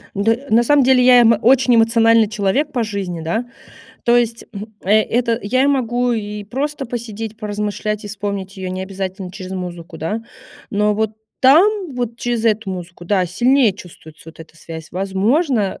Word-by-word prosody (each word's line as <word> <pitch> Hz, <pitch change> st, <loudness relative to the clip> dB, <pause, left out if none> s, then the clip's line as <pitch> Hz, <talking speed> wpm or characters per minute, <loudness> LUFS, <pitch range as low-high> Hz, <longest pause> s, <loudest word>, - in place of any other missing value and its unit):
Д 225 Hz, +6 st, 0 dB
на 230 Hz, +2 st, +4 dB
самом 285 Hz, +3 st, +4 dB
деле 255 Hz, 0 st, +4 dB
я, 245 Hz, -1 st, +7 dB
м, 230 Hz, -2 st, +4 dB
очень 255 Hz, +1 st, +4 dB
эмоциональный 230 Hz, 0 st, +4 dB
человек 225 Hz, +8 st, 0 dB
по 245 Hz, -3 st, -1 dB
жизни, 195 Hz, -6 st, -4 dB
да. 220 Hz, +9 st, -2 dB, 0.6 s
То 240 Hz, 0 st, +4 dB
есть, 235 Hz, -1 st, 0 dB
хм, 205 Hz, 0 st, -6 dB, 0.2 s
э 210 Hz, +3 st, +4 dB
это 235 Hz, 0 st, 0 dB
я 255 Hz, +6 st, +1 dB
и -, -, +3 dB
могу 245 Hz, -3 st, +1 dB
и 210 Hz, -2 st, -4 dB
просто 275 Hz, +6 st, -3 dB
посидеть, 225 Hz, -2 st, -6 dB
поразмышлять, 210 Hz, 0 st, -3 dB
и -, -, -6 dB
вспомнить 200 Hz, -1 st, -5 dB
ее 190 Hz, -1 st, -5 dB
необязательно 190 Hz, 0 st, -5 dB
через 185 Hz, 0 st, -8 dB
музыку, 175 Hz, -3 st, -7 dB
да, 210 Hz, +8 st, -3 dB, 0.5 s
но 210 Hz, +1 st, +1 dB
вот 220 Hz, 0 st, 0 dB, 0.3 s
там 350 Hz, +4 st, +4 dB
вот 240 Hz, -2 st, -3 dB
через 240 Hz, -1 st, -2 dB
эту 215 Hz, -2 st, +1 dB
музыку, 175 Hz, -1 st, -8 dB
да, 185 Hz, 0 st, +1 dB
сильнее 240 Hz, +5 st, +3 dB
чувствуется 160 Hz, -4 st, -14 dB
вот 165 Hz, -, -17 dB
эта 160 Hz, 0 st, -14 dB
связь. 160 Hz, 0 st, -9 dB
Возможно, 200 Hz, -, 0 dB
215 Hz, 170 wpm, -18 LUFS, 190-240 Hz, 0.6 s, я